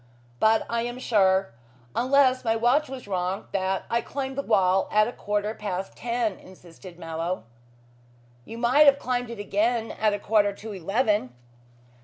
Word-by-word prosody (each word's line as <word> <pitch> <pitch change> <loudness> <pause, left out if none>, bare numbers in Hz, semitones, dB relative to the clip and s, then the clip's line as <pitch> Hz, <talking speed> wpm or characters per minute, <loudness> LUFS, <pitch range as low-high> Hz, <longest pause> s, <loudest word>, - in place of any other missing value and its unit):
"But 220 0 +3
I 235 0 -1
am 240 +1 -4
sure 195 - +2 0.4
unless 260 0 +3
my 225 -2 +1
watch 250 +6 +2
was 265 -5 -8
wrong, 185 0 -2
that 190 0 -1
I 235 0 0
climbed 270 0 -5
the 280 - -1
wall 190 -6 +2
at 215 0 +4
a - - -4
quarter 210 -1 -2
past 195 -3 -5
ten," 235 -4 -2
insisted 180 -1 -14
Mallow. 165 0 -4 1.0
"You 225 - -9
might 255 +6 +5
have 280 0 +7
climbed 245 -3 -2
it 235 - -7
again 220 +3 0
at 215 -1 +1
a - - -3
quarter 205 0 +2
to 215 +2 -9
eleven." 200 - 0
215 Hz, 160 wpm, -25 LUFS, 190-240 Hz, 1.0 s, have